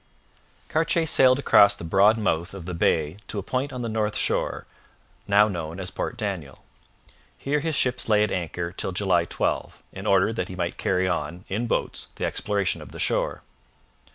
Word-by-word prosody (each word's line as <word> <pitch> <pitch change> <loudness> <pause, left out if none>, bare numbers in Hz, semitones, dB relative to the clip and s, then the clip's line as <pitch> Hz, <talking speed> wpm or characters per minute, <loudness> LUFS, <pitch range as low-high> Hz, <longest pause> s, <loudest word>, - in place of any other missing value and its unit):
Cartier 165 +1 +1
sailed 130 -4 +5
across 100 -7 +5
the 85 - -10
broad 100 +6 +4
mouth 90 -3 -1
of 95 -4 -8
the 90 - -5
bay 80 0 +1
to - - -5
a 100 - -2
point 130 +7 -2
on 125 -2 -5
the - - -2
north 110 -1 -1
shore, - - -1 0.6
now 105 +1 +5
known 85 -3 -5
as 95 -1 -5
Port - - -4
Daniel. 95 - -5 0.7
Here 145 +2 -1
his 160 +1 -2
ships 125 -3 0
lay 105 -1 +5
at 105 - -1
anchor 85 -1 -3
till 95 0 -3
July 90 -3 +2
12, - - -2
in - - -6
order 100 +3 +3
that 115 - -3
he 95 - -6
might 85 -1 -3
carry 95 0 +1
on, 90 +1 -3
in 110 +5 -1
boats, - - -2
the - - -2
exploration 100 -2 -1
of - - -11
the - - -8
shore. - - -1
100 Hz, 185 wpm, -25 LUFS, 90-115 Hz, 0.7 s, sailed